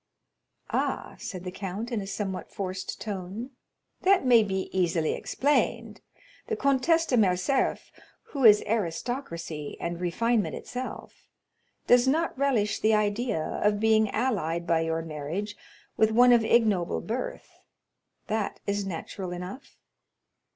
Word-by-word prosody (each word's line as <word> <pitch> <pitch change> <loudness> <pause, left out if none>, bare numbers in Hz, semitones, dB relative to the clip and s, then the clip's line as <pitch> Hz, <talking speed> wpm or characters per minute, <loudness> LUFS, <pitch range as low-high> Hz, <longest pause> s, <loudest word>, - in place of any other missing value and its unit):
30107m - - +2
"Ah," - - -3
said 185 -4 -6
the 180 - -5
count, 200 +5 -5
in 225 -3 -1
a 195 - -7
somewhat 195 -1 -4
forced 190 -1 -5
tone, 205 +4 -5 0.5
"that 380 -5 +4
may 240 -3 +7
be 190 -2 -2
easily 170 -3 +1
explained; 290 +2 0 0.5
the 450 - -1
Comtesse 280 +2 +2
de 255 - +1
Morcerf, 195 +6 +1 0.3
who 275 -3 -5
is 210 -2 +8
aristocracy 170 - -3
and 170 +1 -4
refinement 220 +5 0
itself, 255 +1 -7 0.6
does 245 +1 +5
not 320 +5 +1
relish 250 -7 +1
the 215 0 +3
idea 210 -3 0 0.2
of 205 0 +2
being 220 -1 +3
allied 185 -9 -1
by 165 -1 +2
your 165 0 -1
marriage 165 +7 -4 0.4
with 220 - +4
one 245 +2 +6
of 235 -2 +5
ignoble 215 -6 +2
birth; 240 +4 -5 0.7
that 215 -1 -2
is 200 -1 -1
natural 185 +1 -5
enough." 180 +7 -8
210 Hz, 130 wpm, -27 LUFS, 180-240 Hz, 0.7 s, is